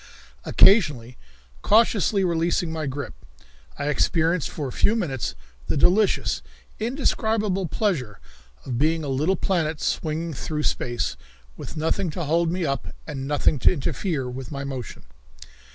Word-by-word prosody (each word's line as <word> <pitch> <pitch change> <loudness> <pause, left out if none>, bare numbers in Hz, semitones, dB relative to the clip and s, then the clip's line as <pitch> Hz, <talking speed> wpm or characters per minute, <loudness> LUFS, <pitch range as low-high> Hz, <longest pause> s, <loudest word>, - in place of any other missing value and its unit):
Occasionally 145 - +4 0.5
cautiously 210 -2 +3
releasing 170 -1 +1
my 160 -2 -3
grip, 140 +2 -5 0.6
I - - -3
experienced 165 +2 +1
for 145 -3 -4
a - - -5
few 210 - +2
minutes 150 - -2 0.3
the - - 0
delicious, 195 +8 +3 0.4
indescribable 220 - 0
pleasure 150 - -1 0.5
of 125 -3 -3
being 160 +2 +2
a 145 - -3
little 150 +8 +1
planet 165 -4 0
swinging 160 +1 -2
through 150 +2 -3
space, 120 -4 -1 0.4
with - - -8
nothing 160 +3 0
to 175 - -1
hold 165 +2 +2
me 180 -1 -1
up 140 -2 -2 0.2
and 135 -3 -5
nothing 145 0 +2
to - - +5
interfere 150 -2 -2
with 125 0 -7
my 140 -1 -4
motion. 130 -5 -6
160 Hz, 135 wpm, -24 LUFS, 140-185 Hz, 0.6 s, to